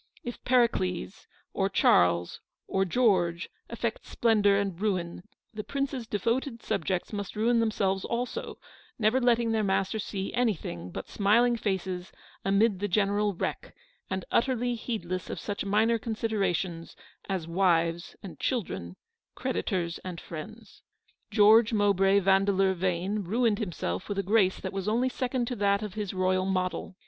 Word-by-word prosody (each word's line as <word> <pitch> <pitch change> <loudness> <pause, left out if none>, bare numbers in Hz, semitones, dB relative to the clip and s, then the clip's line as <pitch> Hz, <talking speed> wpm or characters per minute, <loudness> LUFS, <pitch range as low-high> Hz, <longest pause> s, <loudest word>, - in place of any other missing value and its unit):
If 240 - -7
Pericles, 220 -6 +1 0.3
or 195 0 0
Charles, 90 - +3 0.3
or 190 0 +1
George, 180 -5 +1 0.2
affects 235 -1 -4
splendour 210 -4 +3
and 195 -3 -1
ruin, 180 -5 -1 0.3
the 215 -1 -5
prince's 275 -3 -3
devoted 230 +4 -1
subjects 180 +5 -2
must 205 -1 -4
ruin 230 +2 +2
themselves 195 -4 0
also, 250 - -3 0.4
never 230 +3 +2
letting 235 -2 +3
their 220 -1 +1
master 195 +2 0
see 195 -2 -4
anything 170 - -1
but - - -7
smiling 235 +4 +3
faces 190 -4 -3 0.3
amid 200 0 +2
the 205 - -1
general 205 +1 +1
wreck, - - -4 0.3
and 190 -1 -3
utterly 245 -1 +1
heedless 185 -7 -4
of - - -4
such 200 -1 -4
minor 220 +3 +2
considerations 195 -7 -2 0.3
as 185 -4 -2
wives 170 -1 +1
and 190 - -9
children, 165 - -3 0.4
creditors 170 - -2
and 180 -2 -7
friends. 215 +8 -10 0.5
George 220 +2 +6
Mowbray 200 -2 +3
Vandeleur 195 0 +3
Yane 185 +3 -1
ruined 220 +3 +1
him 210 -6 -2
self 90 - -4
with 205 - -2
a 195 - 0
grace 195 -1 +2
that - - -5
was 195 0 -3
only 240 +4 +2
second 255 -1 -1
to 245 - -3
that 200 0 +2
of 210 -3 -5
his 210 -3 -3
royal 185 0 +1
model. 185 0 -2
200 Hz, 145 wpm, -28 LUFS, 185-225 Hz, 0.5 s, George